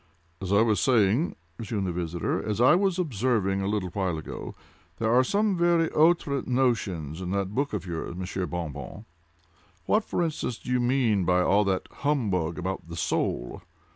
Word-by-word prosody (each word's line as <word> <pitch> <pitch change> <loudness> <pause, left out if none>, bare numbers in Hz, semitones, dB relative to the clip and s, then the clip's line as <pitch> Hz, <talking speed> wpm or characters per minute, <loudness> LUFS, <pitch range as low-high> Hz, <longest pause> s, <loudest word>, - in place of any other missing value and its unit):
"As 95 0 -4
I 100 +2 +5
was 110 -3 +2
saying," 120 - +2 0.2
resumed 105 -3 -3
the 90 - -1
visitor—"as 85 +5 -2
I 125 - +6
was 190 0 +2
observing 110 - 0
a 95 - -1
little 100 -3 -1
while 95 -3 -1
ago, 80 - -7 0.4
there 115 0 +1
are 125 +1 +5
some 205 +7 +1
very 170 -1 +3
outré 155 -3 +2
notions 100 - 0
in 90 - -4
that 100 0 -1
book 140 +4 0
of 100 -4 -4
yours 85 -1 -5
Monsieur 95 0 -3
Bon 85 -3 -4
Bon. 85 +9 -9 0.8
What, 215 +1 +2
for 175 - -1
instance, 155 -7 -2
do - - -7
you 125 - +2
mean 120 -5 +2
by 90 +1 +3
all 100 +3 +3
that 95 -1 -1
humbug 100 - -1
about 95 -1 -4
the 85 - -6
soul? 80 -1 -2
105 Hz, 175 wpm, -27 LUFS, 90-130 Hz, 0.8 s, I